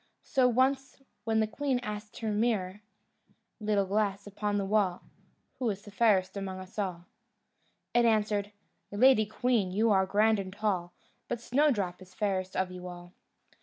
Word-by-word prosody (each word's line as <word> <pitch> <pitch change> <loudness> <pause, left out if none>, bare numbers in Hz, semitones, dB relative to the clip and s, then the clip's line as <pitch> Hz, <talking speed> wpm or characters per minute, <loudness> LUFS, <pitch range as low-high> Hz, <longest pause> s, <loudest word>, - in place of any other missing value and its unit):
So 260 -3 +3
once, 265 +3 +1 0.3
when 220 -1 +2
the - - +3
queen 265 +4 -1
asked 210 -1 -6
of - - -10
her 220 - 0
mirror: 210 -3 0 0.8
"Little 210 -2 +1
glass 200 0 0
upon 205 0 -2
the 200 - -1
wall, 195 -3 +1 0.6
Who 250 -3 +1
is 200 -1 -4
fairest 205 -3 +2
among 195 -1 -4
us 185 +3 -9
all?" 180 -4 -3 0.9
it 240 - +4
answered: 210 -2 +1 0.4
"Lady 215 0 +4
queen, 225 -3 +1
you 215 +4 +2
are 190 -1 +3
grand 215 +2 +3
and 190 -1 -5
tall, 190 -4 -2 0.3
But 240 - -3
Snowdrop 235 -9 +1
is 185 0 -15
fairest 190 -3 -1
of 185 -1 0
you 180 0 -8
all." 175 0 -10
205 Hz, 160 wpm, -30 LUFS, 190-225 Hz, 0.9 s, it